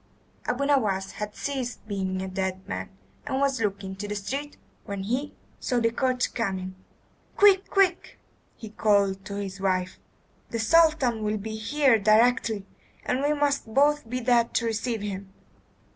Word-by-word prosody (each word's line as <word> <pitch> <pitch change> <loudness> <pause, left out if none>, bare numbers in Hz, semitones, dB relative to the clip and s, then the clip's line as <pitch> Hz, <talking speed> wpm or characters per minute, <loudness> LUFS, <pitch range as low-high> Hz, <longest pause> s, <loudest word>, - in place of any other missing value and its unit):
Abu 250 +3 0
Nowas 210 -9 +1
had 210 0 -6
ceased 260 -5 -4
being 190 -2 -2
a - - -4
dead 190 0 -3
man, 95 0 -4 0.4
and 265 - -1
was 275 -3 +1
looking 200 -2 -2
into 195 +2 -6
the 210 - -3
street 275 +9 -4 0.3
when 200 -2 -5
he 255 +8 -2 0.2
saw 245 - 0
the 230 -1 +2
coach 255 +1 0
coming. 190 -5 -2 0.6
"Quick! 400 -1 +5
quick!" 385 -3 +1 0.4
he 220 -2 -10
called 200 -3 +2
to 200 - -6
his 195 -1 -5
wife. 185 -1 -1 0.5
"The 230 - -3
Sultan 265 -2 +3
will 215 0 0
be 220 +2 -5
here 255 +2 +3
directly, 220 0 +3 0.4
and 255 - 0
we 290 +1 +2
must 285 -5 0
both 290 -2 +3
be 250 +1 -2
dead 235 -1 +2
to 235 - +2
receive 225 -1 -2
him." 195 -1 -5
225 Hz, 160 wpm, -26 LUFS, 195-265 Hz, 0.6 s, Quick